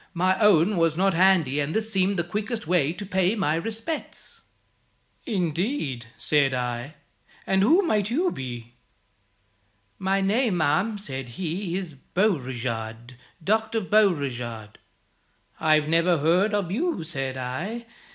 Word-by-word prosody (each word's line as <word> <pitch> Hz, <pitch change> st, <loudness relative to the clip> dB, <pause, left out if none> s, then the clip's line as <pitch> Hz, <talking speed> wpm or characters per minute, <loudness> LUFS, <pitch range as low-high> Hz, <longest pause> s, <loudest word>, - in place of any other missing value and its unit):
My 185 Hz, +2 st, +2 dB
own 205 Hz, -2 st, +4 dB
was 165 Hz, -1 st, +2 dB
not 195 Hz, +1 st, +3 dB
handy, 170 Hz, -6 st, +3 dB
and 145 Hz, +2 st, -2 dB
this 220 Hz, 0 st, +1 dB
seemed 195 Hz, 0 st, +2 dB
the 170 Hz, -, +1 dB
quickest 210 Hz, +5 st, -4 dB
way 160 Hz, -3 st, +2 dB
to 195 Hz, +4 st, -7 dB
pay 190 Hz, +1 st, +1 dB
my 190 Hz, -8 st, +1 dB
respects.' 225 Hz, -, -5 dB, 0.9 s
'Indeed?' 175 Hz, -, -2 dB
said 140 Hz, -3 st, +2 dB
I, 125 Hz, +3 st, -3 dB, 0.5 s
'and 190 Hz, 0 st, +2 dB
who 330 Hz, -, +4 dB
may 215 Hz, -10 st, +2 dB
you 275 Hz, -, 0 dB
be?' 120 Hz, -2 st, -7 dB, 1.3 s
'My 195 Hz, +1 st, +1 dB
name, 205 Hz, +1 st, +1 dB
ma'am,' 170 Hz, +8 st, +1 dB
said 135 Hz, -10 st, -6 dB
he, 175 Hz, +1 st, -3 dB
'is 180 Hz, -5 st, -5 dB
Beauregard 125 Hz, -, -2 dB, 0.3 s
Dr. 220 Hz, +4 st, +1 dB
Beauregard.' 135 Hz, -, 0 dB, 0.8 s
'I 155 Hz, -1 st, +4 dB
never 165 Hz, +3 st, +2 dB
heard 180 Hz, +8 st, +2 dB
of 195 Hz, -4 st, -1 dB
you,' 315 Hz, -, -1 dB
said 135 Hz, -5 st, -4 dB
I. 170 Hz, -, -4 dB
175 Hz, 130 wpm, -25 LUFS, 140-205 Hz, 1.3 s, own